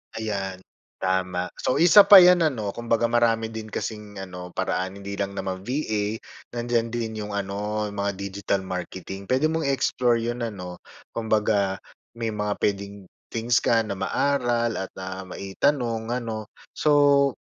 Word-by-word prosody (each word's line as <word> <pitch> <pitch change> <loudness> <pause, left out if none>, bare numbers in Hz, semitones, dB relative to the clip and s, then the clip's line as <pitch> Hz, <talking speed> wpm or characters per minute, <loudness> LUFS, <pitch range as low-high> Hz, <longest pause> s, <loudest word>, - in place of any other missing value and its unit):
Ayan, 100 -4 -4 0.4
tama. 90 -1 0
So, 130 - 0
isa 180 +6 +7
pa 205 - +10
'yan, 180 0 +7
ano? 110 -9 -1
Kumbaga 115 0 0
marami 115 -1 +2
din 110 -1 -6
kasing 105 -1 -5
ano, 90 -1 -9
paraan. 95 0 -1
Hindi 100 0 -6
lang 100 0 -2
naman 95 +1 -4
VA, 110 -6 -1 0.4
nandiyan 120 -1 0
din 115 -2 -2
'yong 105 -1 -5
ano, 105 +2 -2
'yong 100 - -10
mga 100 0 0
digital 100 0 -2
marketing. 95 +1 -6
Puwede 145 +5 +2
mong 160 -3 -1
i-explore 125 -3 +2
'yon 120 +1 -3
ano? 90 -5 -8 0.3
Kumbaga, 105 -3 +1 0.4
may 115 -1 -2
mga 105 -1 -1
puwedeng 100 0 -2 0.3
things 115 +1 +1
ka 115 -1 +2
na 100 -3 -5
maaral 120 -5 0
at, 95 - -5
ah, 95 0 -6
maitanong, 115 +4 -1
ano. 110 -3 -4 0.2
So, 145 -2 +4
110 Hz, 145 wpm, -25 LUFS, 100-120 Hz, 0.4 s, pa